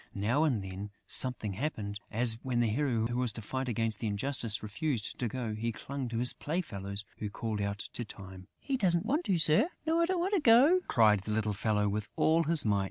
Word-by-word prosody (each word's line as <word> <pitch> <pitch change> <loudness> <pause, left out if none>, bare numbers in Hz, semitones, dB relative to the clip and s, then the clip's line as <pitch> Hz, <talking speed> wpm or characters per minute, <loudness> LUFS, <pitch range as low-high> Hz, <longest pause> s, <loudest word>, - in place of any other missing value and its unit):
Now 120 +10 +1
and 120 -10 0
then, 95 +2 -7 0.2
something 125 -6 -1
happened, 105 -4 -4
as 115 0 +3
when 125 -2 -1
the 120 - +3
hero 120 -2 0
who 120 +1 -2
was 125 -2 +2
to 115 - -7
fight 130 +4 -3
against 115 -1 -2
injustice 110 0 -1
refused 110 +2 -3
to 125 - -1
go. 115 -1 -4
He 115 +2 -2
clung 135 +2 -6
to 115 - -4
his 125 +1 +2
playfellows, 105 - -4
who 105 - -3
called 110 0 -4
out 100 0 -2 0.2
to 120 - -4
Time: 95 -4 -11
"He 275 -2 -2
doesn't 180 -4 +2
want 295 +9 0
to, 190 - +1
Sir!" 160 - +4 0.2
"No, 325 +1 +1
I 335 - +2
don't 370 -1 0
want 375 +4 -1
to 395 - +3
go," 270 +9 +6
cried 105 -3 +4
the 100 +3 -6
little 105 -1 0
fellow, 105 0 0
with 105 +1 -3
all 165 +1 +3
his 160 -3 +7
might. 100 -2 +2
115 Hz, 220 wpm, -31 LUFS, 105-150 Hz, 0.2 s, his